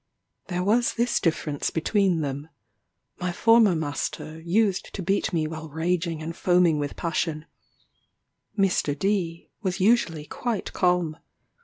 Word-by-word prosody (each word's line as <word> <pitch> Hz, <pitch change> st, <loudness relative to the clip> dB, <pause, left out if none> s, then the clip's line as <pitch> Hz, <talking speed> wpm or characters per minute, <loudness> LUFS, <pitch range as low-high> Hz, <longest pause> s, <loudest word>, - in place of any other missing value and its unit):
There 180 Hz, -1 st, -2 dB
was 230 Hz, +5 st, +2 dB
this 240 Hz, +1 st, +1 dB
difference 155 Hz, -3 st, -1 dB
between 180 Hz, 0 st, +1 dB
them: 145 Hz, +1 st, -4 dB, 0.7 s
my 180 Hz, -1 st, -1 dB
former 225 Hz, -1 st, +5 dB
master 155 Hz, +1 st, -4 dB
used 195 Hz, +2 st, +1 dB
to 195 Hz, -, -4 dB
beat 200 Hz, +4 st, 0 dB
me 165 Hz, -3 st, 0 dB
while 160 Hz, 0 st, -6 dB
raging 165 Hz, +1 st, -1 dB
and 165 Hz, +1 st, -5 dB
foaming 175 Hz, -4 st, +3 dB
with 145 Hz, -1 st, -3 dB
passion; 165 Hz, -2 st, -2 dB, 1.1 s
Mr. 180 Hz, -7 st, +1 dB
D 175 Hz, -2 st, -1 dB
was 185 Hz, -3 st, -2 dB
usually 185 Hz, -7 st, +2 dB
quite 235 Hz, +5 st, -3 dB
calm. 180 Hz, -4 st, +1 dB
175 Hz, 130 wpm, -25 LUFS, 160-195 Hz, 1.1 s, former